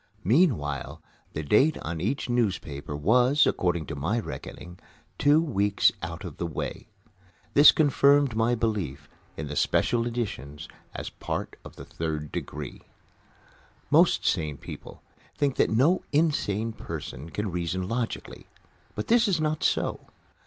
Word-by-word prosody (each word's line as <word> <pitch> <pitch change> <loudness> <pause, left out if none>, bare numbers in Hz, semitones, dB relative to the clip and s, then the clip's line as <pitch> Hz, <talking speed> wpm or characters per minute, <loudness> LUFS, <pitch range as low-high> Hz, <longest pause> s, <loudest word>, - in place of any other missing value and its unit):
Meanwhile, 100 - +1 0.3
the 80 - -3
date 135 - +3
on 80 0 -4
each 110 +10 -1
newspaper 90 - -2
was, 125 - +4
according 85 -3 0
to 80 - -6
my 85 +12 -1
reckoning, 90 -5 -8 0.4
two 145 +2 +5
weeks 105 -10 +2
out 85 +2 -6
of 85 -6 -8
the 85 - -2
way. 80 - -5 0.7
This 145 +1 +9
confirmed 140 -3 +3
my 115 +2 +2
belief 95 - -2 0.3
in 80 - -4
the 75 0 -6
special 120 +9 +1
editions 100 - -5 0.3
as - - -5
a - - -24
part - - -3
of - - -12
the - - -10
Third 75 -2 -4
Degree. 75 -3 -6 1.1
Most - - +4
sane 75 -3 0
people - - -10 0.3
think 140 -2 0
that - - +3
no 140 +12 +3
insane 115 -8 +1
person 75 - -7
can 105 +2 -3
reason 90 +1 -2
logically. 115 +2 -4 0.5
But 105 - -3
this 235 0 +4
is 185 -5 +1
not 155 0 -1
so. - - 0
105 Hz, 140 wpm, -27 LUFS, 80-135 Hz, 1.1 s, This